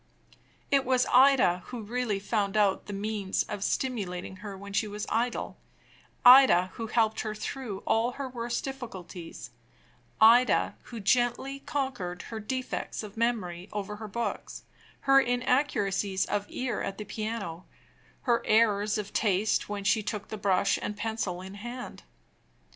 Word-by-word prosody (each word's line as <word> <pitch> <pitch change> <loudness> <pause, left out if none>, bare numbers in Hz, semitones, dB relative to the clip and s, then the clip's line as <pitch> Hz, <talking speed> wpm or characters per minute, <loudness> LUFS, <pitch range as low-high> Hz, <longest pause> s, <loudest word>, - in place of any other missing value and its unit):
It 275 -1 +4
was 255 -1 +2
Ida 250 -9 +5
who 245 -3 -6
really 230 -1 -1
found 200 0 -1
out 200 -2 +2
the - - -5
means 205 -1 -1
of 205 -1 -5
stimulating 190 -8 -2
her 200 0 -8
when 200 +1 -9
she 215 - +1
was 210 0 -5
idle; 235 +2 -1 0.7
Ida 245 -8 +8
who 225 - -5
helped 220 -1 +1
her 215 -1 -3
through 215 -3 -5
all 230 +2 +2
her 275 0 -4
worst 240 -1 -3
difficulties; 190 - -8 0.7
Ida 235 +3 +5
who 235 - -8
gently 245 +5 +1
conquered 250 -12 -3
her 220 - -3
defects 255 +1 -4
of 210 -1 -9
memory 210 -6 -1
over 210 0 -4
her 215 0 -7
books, 235 +3 -4 0.4
her 275 0 +6
inaccuracies 240 -7 +1
of 205 0 -2
ear 255 -1 -3
at 195 - -4
the 210 - -6
piano, 205 -5 -5 0.6
her 240 -3 +2
errors 215 -1 +3
of 205 -1 -5
taste 205 0 +1
when 205 -1 -4
she 215 +2 +3
took 210 0 -5
the - - -4
brush 195 -3 +2
and 210 - -4
pencil 210 -5 -3
in 190 +1 -9
hand. 240 +5 -7
215 Hz, 150 wpm, -28 LUFS, 200-245 Hz, 0.7 s, Ida